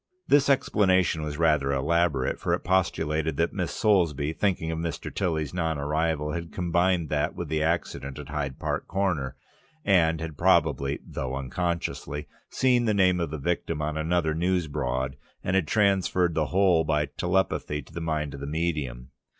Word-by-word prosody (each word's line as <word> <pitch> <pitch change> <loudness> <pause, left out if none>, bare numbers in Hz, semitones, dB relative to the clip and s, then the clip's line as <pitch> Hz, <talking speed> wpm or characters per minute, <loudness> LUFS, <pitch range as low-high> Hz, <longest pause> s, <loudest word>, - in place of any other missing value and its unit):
This 140 -1 +4
explanation 95 - +3
was 75 -1 -4
rather 75 -4 +2
elaborate, 70 0 +1
for - - +1
it - - -8
postulated 80 -4 0
that 85 +1 +1
Miss 90 -4 -2
Soulsby, 80 -8 +2
thinking 85 -4 0
of 80 - -3
Mr. 85 -2 -4
Tilly's 80 -5 -1
non 80 -3 -1
arrival, 75 +1 -1
had 85 -1 -5
combined 85 -1 +1
that 75 -1 0
with 85 -3 -5
the 80 0 0
accident 80 -4 -2
at - - -8
Hyde 70 -3 -3
Park - - -3
Corner, 85 -9 -1 0.5
and 80 -5 +3
had 80 -3 -6
probably 70 +1 +3
(though 65 0 -4
unconsciously) 75 0 -3 0.2
seen 125 -2 +2
the 110 -2 +2
name 90 -2 +4
of 85 - -1
the 80 - -4
victim 85 +1 -2
on 75 +1 -2
another 80 0 +1
news 90 +2 +1
board 65 -2 -2 0.3
and 90 - 0
had 95 -5 +2
transferred 95 -4 +2
the 80 -1 0
whole 90 -3 +3
by 75 -1 +1
telepathy 75 -1 -1
to 80 - -18
the 85 - -5
mind 75 -3 -2
of 70 - -7
the 70 - -5
medium. 75 -6 -3
80 Hz, 170 wpm, -26 LUFS, 75-90 Hz, 0.5 s, This